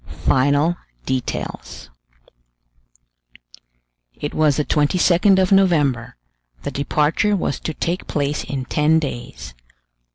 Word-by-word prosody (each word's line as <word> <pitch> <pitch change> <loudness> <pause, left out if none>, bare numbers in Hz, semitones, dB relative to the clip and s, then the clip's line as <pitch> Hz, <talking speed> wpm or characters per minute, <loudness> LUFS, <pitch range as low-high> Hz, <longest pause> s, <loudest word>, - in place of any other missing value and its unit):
FINAL 145 +6 +2 0.3
DETAILS 65 - -5 2.3
It 145 - -4
was 150 -3 +2
the 150 - 0
22nd 175 +5 +3
of 185 0 +2
November; 150 -11 +2 0.5
the - - -3
departure 150 +8 +1
was 190 - -2
to 160 - -5
take 175 +2 -3
place 145 0 -2
in 135 -2 -4
ten 150 +4 +2
days. 140 -6 -5
150 Hz, 100 wpm, -20 LUFS, 140-175 Hz, 2.3 s, 22nd